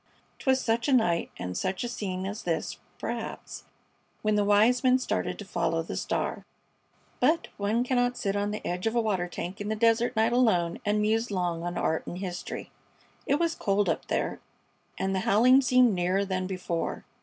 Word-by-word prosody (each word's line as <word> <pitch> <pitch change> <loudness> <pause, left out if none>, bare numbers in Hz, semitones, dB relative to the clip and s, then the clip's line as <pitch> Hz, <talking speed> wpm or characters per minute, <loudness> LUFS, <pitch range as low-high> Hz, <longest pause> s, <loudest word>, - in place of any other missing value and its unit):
'Twas 265 -1 +2
such 230 -2 0
a 280 - +3
night 175 -9 +2
and 90 0 -5
such 185 - -2
a - - -2
scene 190 -5 -4
as 205 +3 -4
this, 165 -2 -2 0.2
perhaps, - - -5 0.6
when 215 0 +2
the 210 0 +3
wise 215 +5 +4
men 255 0 +5
started 260 - -2
to 205 - -8
follow 170 -3 -1
the - - -6
star! - - -2 0.8
But 315 +7 +2
one 210 +4 +1
cannot 245 -1 +1
sit 200 0 -1
on 205 0 0
the 210 +1 -5
edge 180 +4 -2
of 225 - -1
a - - +4
water 195 -6 0
tank 180 +3 -6
in 205 - -3
the 220 - 0
desert 230 +2 +2
night 225 +2 +2
alone 180 -9 +2
and 210 0 +2
muse 225 +2 +1
long 175 -4 -1
on 175 +1 -3
art 160 - -1
and 175 - -5
history. 180 -2 -5 0.6
It 280 - +3
was 335 +2 +1
cold 200 0 +1
up - - -2
there, - - -1 0.6
and 190 0 -1
the 190 - +1
howling 245 +8 +5
seemed 250 -3 +4
nearer 185 +2 +1
than 185 -1 -2
before. 180 -3 -3
205 Hz, 190 wpm, -28 LUFS, 185-240 Hz, 0.8 s, men